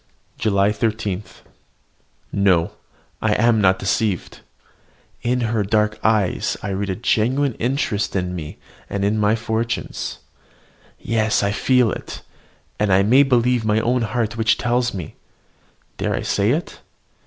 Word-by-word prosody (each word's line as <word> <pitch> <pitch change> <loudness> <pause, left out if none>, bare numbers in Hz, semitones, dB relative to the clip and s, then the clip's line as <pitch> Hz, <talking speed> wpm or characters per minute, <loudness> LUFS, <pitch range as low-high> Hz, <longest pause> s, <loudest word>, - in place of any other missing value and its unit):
JULY 100 -1 +2
13. 105 -3 -1 1.1
No, 95 -4 +2 0.5
I - - +2
am 115 0 +3
not 95 -1 +4
deceived. 100 -1 -1 0.8
In 125 +1 0
her 115 -2 0
dark 105 +1 +1
eyes 105 -4 +1
I - - -3
read 100 +1 -2
a 95 - -1
genuine 125 +6 +1
interest 120 -5 -1
in 90 -1 -1
me 80 -4 -7 0.3
and 100 0 -1
in 105 +2 +1
my 105 +1 +3
fortunes. 115 0 -3 0.8
Yes, 110 -2 +1
I 100 - +1
feel 125 +1 +2
it; - - -7 0.6
and 105 -2 +1
I 95 +1 +5
may 125 +7 +5
believe 125 -3 +2
my 110 0 +2
own 120 +2 +1
heart 115 -1 -2
which 110 -2 +2
tells 125 0 0
me 90 -6 -7 0.8
dare - - 0
I - - -3
say 100 +1 +1
it? 155 +8 -2
110 Hz, 140 wpm, -21 LUFS, 100-120 Hz, 1.1 s, I